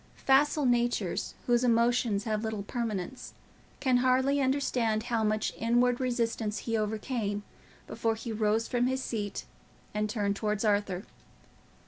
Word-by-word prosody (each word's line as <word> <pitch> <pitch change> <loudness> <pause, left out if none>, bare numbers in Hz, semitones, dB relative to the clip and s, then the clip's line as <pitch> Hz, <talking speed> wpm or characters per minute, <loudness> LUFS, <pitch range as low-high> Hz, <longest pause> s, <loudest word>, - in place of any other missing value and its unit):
Facile 285 +2 +4
natures, 240 -6 0
whose 240 0 +3
emotions 235 -3 +2
have 215 -1 -1
little 220 -2 -3
permanence, 225 0 -4 0.4
can 260 -3 +3
hardly 260 +3 +3
understand 250 -5 +1
how 230 -2 0
much 215 0 0
inward 240 +2 +2
resistance 230 -4 -1
he 230 +1 -2
overcame 215 -1 -2 0.4
before 225 -1 -1
he 225 +1 -6
rose 215 +1 +1
from 245 -1 +1
his 260 0 -1
seat 205 -3 -4 0.5
and 210 0 -1
turned 205 -2 0
towards 210 +1 -1
Arthur. 205 -3 +1
230 Hz, 130 wpm, -29 LUFS, 210-245 Hz, 0.5 s, Facile